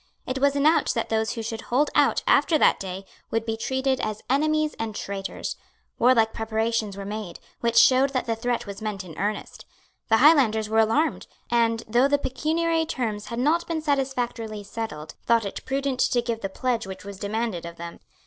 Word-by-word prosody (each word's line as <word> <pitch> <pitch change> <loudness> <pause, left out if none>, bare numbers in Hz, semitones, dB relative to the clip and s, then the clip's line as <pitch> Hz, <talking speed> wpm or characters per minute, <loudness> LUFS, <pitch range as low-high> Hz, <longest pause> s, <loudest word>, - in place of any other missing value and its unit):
It 255 +1 -3
was 280 +1 +3
announced 300 +3 +3
that 230 - -1
those 220 0 0
who 230 - -5
should 225 0 -4
hold 275 +5 +1
out - - +3
after 320 - +4
that - - +4
day 190 0 -6 0.2
would 225 0 -1
be 225 -1 -1
treated 265 +3 -1
as 215 -2 -3
enemies 310 +2 +2
and 220 -2 -3
traitors. 195 -1 -5 0.4
Warlike 230 -3 +4
preparations 220 -2 -1
were 200 - -6
made, 205 -3 -6 0.2
which 235 0 0
showed 255 +4 +6
that 260 -2 -2
the 230 - -1
threat 240 +1 -2
was 200 0 -8
meant 210 -3 -3
in 165 -4 -11
earnest. 210 +1 -3 0.5
The 225 - +5
Highlanders 235 -7 +5
were 220 +1 +2
alarmed, 225 +9 +1 0.2
and, 230 -1 +2
though 240 +5 +4
the 285 0 +3
pecuniary 320 +4 0
terms 220 -8 -3
had 235 - -5
not 310 +7 +1
been 320 -2 -2
satisfactorily 245 -7 -2
settled, 200 -7 -6
thought 230 -2 +3
it 200 - -6
prudent 270 -1 -1
to 245 -1 +2
give 230 -2 -3
the 195 - -3
pledge 240 +1 -2
which 190 +1 -8
was 200 -1 -8
demanded 210 -3 -2
of 170 0 -8
them. 170 0 -8
230 Hz, 190 wpm, -25 LUFS, 215-265 Hz, 0.5 s, showed